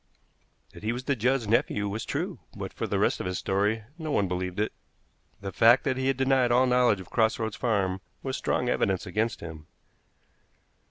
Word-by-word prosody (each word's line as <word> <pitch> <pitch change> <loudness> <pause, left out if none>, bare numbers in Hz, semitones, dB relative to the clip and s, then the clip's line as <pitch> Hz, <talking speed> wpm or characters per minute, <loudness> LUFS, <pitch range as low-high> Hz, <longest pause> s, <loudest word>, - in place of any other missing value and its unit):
That - - -12
he 110 +2 -1
was 125 +1 -5
the 140 +1 0
Judds' 125 0 +1
nephew 105 -2 +1
was 105 +3 -4
true, - - -3 0.2
but - - -5
for - - -3
the - - 0
rest - - +2
of - - -3
his 90 -1 -2
story, 105 +3 0 0.2
no 160 -1 -4
one 100 -8 +2
believed 90 +1 -3
it. 105 - 0 0.7
The 100 -1 -4
fact 120 +5 +5
that 130 -3 0
he 130 0 -1
had 135 -1 +1
denied 135 -2 +3
all 125 +2 +5
knowledge 125 -5 +3
of 90 - -14
Cross 110 0 +2
Roads 110 -3 -3
Farm 100 -5 0 0.2
was 130 -1 -2
strong 125 - 0
evidence 95 -6 +1
against 105 +2 -1
him. 80 -2 -9
110 Hz, 200 wpm, -27 LUFS, 100-125 Hz, 0.7 s, fact